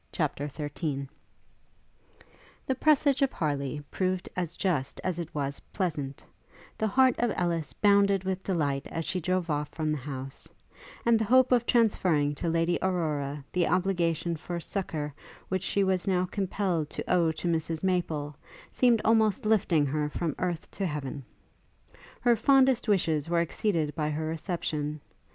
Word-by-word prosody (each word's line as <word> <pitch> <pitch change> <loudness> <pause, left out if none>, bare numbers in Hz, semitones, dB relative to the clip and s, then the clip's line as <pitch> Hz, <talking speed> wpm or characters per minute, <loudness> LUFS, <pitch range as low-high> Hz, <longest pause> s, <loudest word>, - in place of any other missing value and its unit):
CHAPTER 145 -3 -1
XIII 145 -1 -4 1.6
The 265 - +1
presage 285 0 +3
of 275 -1 +3
Harleigh 145 -2 -2
proved 185 -1 -1
as 175 -3 -3
just 160 -9 -1
as 180 -2 -1
it 165 -2 -4
was 140 -1 -2
pleasant: 150 -8 -3 0.5
the 220 - 0
heart 260 +4 +4
of 240 -2 +2
Ellis 170 -3 -1
bounded 200 -2 +4
with 190 0 -2
delight 145 -7 -1
as 165 -1 -4
she 185 - -1
drove 180 -1 -1
off 150 0 -1
from 155 -2 -2
the 150 - -1
house; 135 0 -7 0.6
and 235 -1 +5
the - - +1
hope 255 +3 +5
of 240 -1 +3
transferring 180 - +3
to 165 +3 -3
Lady 165 +1 +1
Aurora 150 -6 -1
the 180 -2 +1
obligation 175 -2 +1
for 170 +2 -5
succour 155 -5 -3 0.4
which 185 -1 0
she 200 +1 +1
was 190 -1 0
now 185 -1 +2
compelled 185 -4 -1
to - - -5
owe 170 -3 +3
to 160 - -4
Mrs 165 -1 -1
Maple, 160 -6 -1 0.4
seemed 240 -3 +3
almost 220 +1 +3
lifting 185 -8 +3
her 150 +1 -1
from 160 0 -2
earth 175 -3 -3
to 195 - -2
heaven. 140 -3 -4 1.0
Her 240 -1 +4
fondest 260 +1 +4
wishes 165 -7 +1
were 170 0 +2
exceeded 165 -3 -1
by 150 -1 -1
her 155 +1 -2
reception. 155 -2 -3
170 Hz, 155 wpm, -28 LUFS, 150-195 Hz, 1.6 s, and